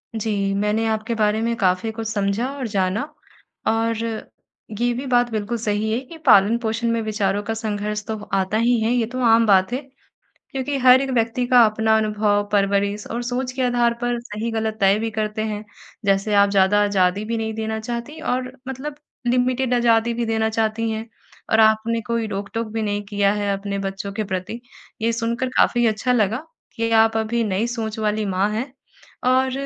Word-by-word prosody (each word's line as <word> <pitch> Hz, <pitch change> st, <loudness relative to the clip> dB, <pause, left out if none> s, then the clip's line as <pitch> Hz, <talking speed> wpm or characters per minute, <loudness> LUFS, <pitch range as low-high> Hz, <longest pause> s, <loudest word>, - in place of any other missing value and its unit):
जी। 205 Hz, -3 st, -1 dB
मैंने 210 Hz, +3 st, 0 dB
आपके 220 Hz, +1 st, -1 dB
बारे 215 Hz, 0 st, +1 dB
में 230 Hz, +1 st, 0 dB
काफ़ी 185 Hz, +3 st, +1 dB
कुछ 225 Hz, 0 st, -5 dB
समझा 205 Hz, +2 st, -1 dB
और 270 Hz, -4 st, -4 dB
जाना 195 Hz, +2 st, 0 dB, 0.6 s
और 225 Hz, 0 st, +1 dB, 0.8 s
ये 240 Hz, +1 st, +2 dB
भी 260 Hz, +3 st, -5 dB
बात 245 Hz, -1 st, +3 dB
बिल्कुल 220 Hz, +2 st, -2 dB
सही 215 Hz, -1 st, -1 dB
है 230 Hz, -, +1 dB
कि 330 Hz, +4 st, -11 dB
पालन-पोषण 225 Hz, +3 st, +4 dB
में 230 Hz, 0 st, 0 dB
विचारों 205 Hz, -2 st, -1 dB
का 225 Hz, -, -2 dB
संघर्ष 210 Hz, -1 st, -3 dB
तो 220 Hz, -1 st, -3 dB, 0.2 s
आता 195 Hz, +2 st, +1 dB
ही 235 Hz, +1 st, +3 dB
है 225 Hz, -, +1 dB
ये 245 Hz, -2 st, +2 dB
तो 255 Hz, -, -3 dB
आम 230 Hz, 0 st, +5 dB
बात 190 Hz, 0 st, +4 dB
है। 255 Hz, -, 0 dB, 0.7 s
क्योंकि 270 Hz, +1 st, -2 dB
हर 255 Hz, 0 st, +7 dB
एक 270 Hz, 0 st, -2 dB
व्यक्ति 235 Hz, 0 st, 0 dB
का 245 Hz, -1 st, +6 dB
अपना 220 Hz, +1 st, +2 dB
अनुभव 210 Hz, -1 st, +1 dB
परवरिश 200 Hz, 0 st, +1 dB
और 235 Hz, +1 st, -2 dB
सोच 250 Hz, +1 st, -2 dB
के 255 Hz, 0 st, -2 dB
आधार 240 Hz, -1 st, +2 dB
पर 240 Hz, -1 st, -1 dB
सही-गलत 220 Hz, -1 st, -3 dB
तय 195 Hz, +1 st, +4 dB
भी 225 Hz, +1 st, -2 dB
करते 215 Hz, 0 st, -2 dB
हैं। 210 Hz, -1 st, -4 dB, 0.4 s
जैसे 200 Hz, +1 st, +1 dB
आप 200 Hz, 0 st, +5 dB
ज़्यादा 200 Hz, +1 st, +4 dB
आज़ादी 200 Hz, 0 st, +1 dB
भी 230 Hz, +1 st, -2 dB
नहीं 220 Hz, 0 st, -3 dB
देना 220 Hz, 0 st, -3 dB
चाहती 240 Hz, +7 st, -5 dB
और 255 Hz, -4 st, -2 dB, 0.2 s
मतलब 280 Hz, +3 st, -5 dB, 0.3 s
लिमिटेड 250 Hz, +1 st, +1 dB
आज़ादी 235 Hz, -1 st, +3 dB
भी 235 Hz, 0 st, -1 dB
देना 220 Hz, 0 st, +1 dB
चाहती 225 Hz, 0 st, 0 dB
हैं 220 Hz, +1 st, -4 dB, 0.4 s
और 220 Hz, -, +5 dB
आपने 220 Hz, +1 st, +3 dB
कोई 230 Hz, -1 st, -1 dB
रोक-टोक 210 Hz, +3 st, -4 dB
भी 225 Hz, 0 st, -2 dB
नहीं 205 Hz, -1 st, -1 dB
किया 200 Hz, -1 st, +1 dB
है 205 Hz, -1 st, -1 dB
अपने 200 Hz, 0 st, -4 dB
बच्चों 195 Hz, 0 st, -4 dB
के 215 Hz, +1 st, -2 dB
प्रति 185 Hz, +6 st, -4 dB, 0.4 s
ये 230 Hz, +1 st, +2 dB
सुनकर 235 Hz, +2 st, -1 dB
काफ़ी 240 Hz, -1 st, +3 dB
अच्छा 225 Hz, +3 st, +1 dB
लगा 225 Hz, +5 st, 0 dB, 0.3 s
कि 230 Hz, 0 st, -1 dB
आप 225 Hz, 0 st, +3 dB
अभी 225 Hz, +1 st, 0 dB
नई 205 Hz, +2 st, 0 dB
सोच 220 Hz, -1 st, -4 dB
वाली 215 Hz, 0 st, 0 dB
माँ 195 Hz, +1 st, +1 dB
हैं। 250 Hz, +5 st, -3 dB, 0.6 s
और 260 Hz, +1 st, +3 dB
220 Hz, 185 wpm, -22 LUFS, 205-235 Hz, 0.8 s, हर